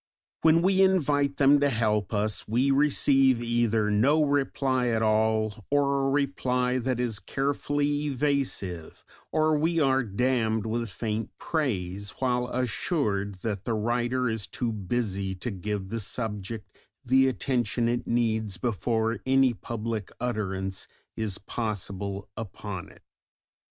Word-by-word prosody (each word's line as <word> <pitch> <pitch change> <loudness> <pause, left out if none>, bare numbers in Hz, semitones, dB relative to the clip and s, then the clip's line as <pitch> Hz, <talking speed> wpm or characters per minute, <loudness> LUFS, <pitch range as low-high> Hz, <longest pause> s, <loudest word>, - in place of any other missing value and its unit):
When 165 +1 +5
we 190 +1 +4
invite 145 -7 +2
them 140 +1 +5
to 145 0 +3
help 105 -5 0
us 105 -1 0
we 125 +6 +2
receive 135 -2 +4
either 115 -2 +1
no 140 +9 +4
reply 135 -3 +1
at 115 -1 +1
all, 110 -1 +1
or 140 -1 +2
a - - +1
reply 130 -3 0
that 125 0 -1
is 115 -4 -1
carefully 145 +2 -1
evasive, 135 - -2 0.3
or 155 0 +3
we 165 +3 +1
are 135 -3 +3
damned 110 -1 0
with 115 +1 -2
faint 110 +2 -3
praise 100 - -2
while 125 -1 0
assured 105 - -1
that 105 -3 -3
the 115 - 0
writer 120 +3 0
is 110 -3 -3
too 120 -2 -2
busy 100 -2 -2
to 115 +6 -5
give 100 0 -4
the 115 +2 -3
subject 105 0 -5 0.3
the 130 +2 +4
attention 120 -3 0
it 120 +1 -1
needs 110 -4 0
before 115 +1 -1
any 135 -1 +4
public 110 0 -4
utterance 95 -5 -3 0.3
is 105 -3 -2
possible 100 -2 -4
upon 100 -3 -6
it. 95 - -19
120 Hz, 130 wpm, -27 LUFS, 105-135 Hz, 0.3 s, When